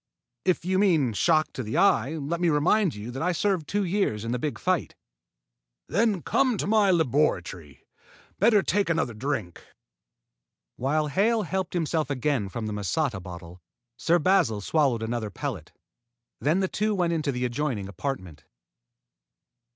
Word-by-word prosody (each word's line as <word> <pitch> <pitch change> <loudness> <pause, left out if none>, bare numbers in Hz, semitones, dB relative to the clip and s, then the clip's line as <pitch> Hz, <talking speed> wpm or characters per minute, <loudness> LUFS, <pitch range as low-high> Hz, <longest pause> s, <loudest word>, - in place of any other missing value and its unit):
"If 185 -2 +1
you 185 +1 +1
mean 160 - +3
shock 155 +7 +2
to - - -4
the 110 -2 -3
eye, 130 +8 +3
let 160 +3 -3
me 175 - +3
remind 165 - +2
you 105 +4 -7
that 135 - -6
I 180 +2 +1
served 185 -3 0
two 205 0 0
years 175 - -1
in 115 - -2
the 125 - -1
big 150 +3 -3
fight." 185 -3 -1 0.9
"Then 210 -5 +1
come 260 -5 +2
to - - -2
my 210 -1 +3
laboratory. 140 - 0 0.5
Better 210 -1 +4
take 200 -3 +1
another 160 -7 0
drink." 110 -6 -4 1.1
While 150 +4 0
Hale 215 +8 +2
helped 190 -1 -3
himself 160 -2 0
again 135 -6 -1
from 115 +3 -5
the 105 - -3
masata 105 - -1
bottle, 90 0 -10 0.3
Sir 165 +8 +2
Basil 175 - +2
swallowed 130 0 +1
another 110 -1 -3
pellet. 100 - -5 0.7
Then 160 +6 +1
the 190 - +1
two 215 +2 -1
went 175 -3 +1
into 155 -3 -1
the 125 -1 -2
adjoining 120 -5 -2
apartment. 95 - -5
150 Hz, 155 wpm, -26 LUFS, 115-185 Hz, 1.1 s, Better